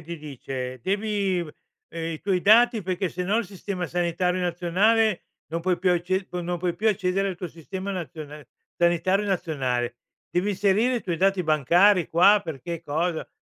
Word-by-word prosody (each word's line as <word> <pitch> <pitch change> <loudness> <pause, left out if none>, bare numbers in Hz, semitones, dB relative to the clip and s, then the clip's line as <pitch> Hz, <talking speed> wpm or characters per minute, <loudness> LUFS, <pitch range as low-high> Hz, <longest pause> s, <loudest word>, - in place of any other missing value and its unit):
ti 170 +2 -7
dice: 130 -4 -6
"Devi 200 - 0
v 155 - -8 0.4
uhm, 165 - -6
i 155 - -7
tuoi 190 -3 0
dati 225 +1 +5
perché 185 +1 -2
sennò 180 +5 -1
il 235 - -1
sistema 190 -2 -5
sanitario 180 +1 0
nazionale 185 +4 +2 0.2
non 165 +1 -4
puoi 180 +1 +1
più 185 0 +2
acce 185 +2 0
tu 180 - -4
non 175 0 -3
puoi 175 0 -1
più 220 +3 +1
accedere 195 -1 0
al 185 - -4
tuo 175 0 -5
sistema 185 +5 -6
nazionale 150 -6 -7 0.3
sanitario 175 +4 +2
nazionale. 130 -10 -1 0.3
Devi 180 +4 0
inserire 205 +5 +2
i 235 - -4
tuoi 175 -3 -2
dati 195 +1 +2
bancari 170 +5 +4
qua." 195 +5 +5
Per 150 -5 -6
che 170 +5 -5
cosa? 160 +2 -2
180 Hz, 175 wpm, -25 LUFS, 165-195 Hz, 0.4 s, dati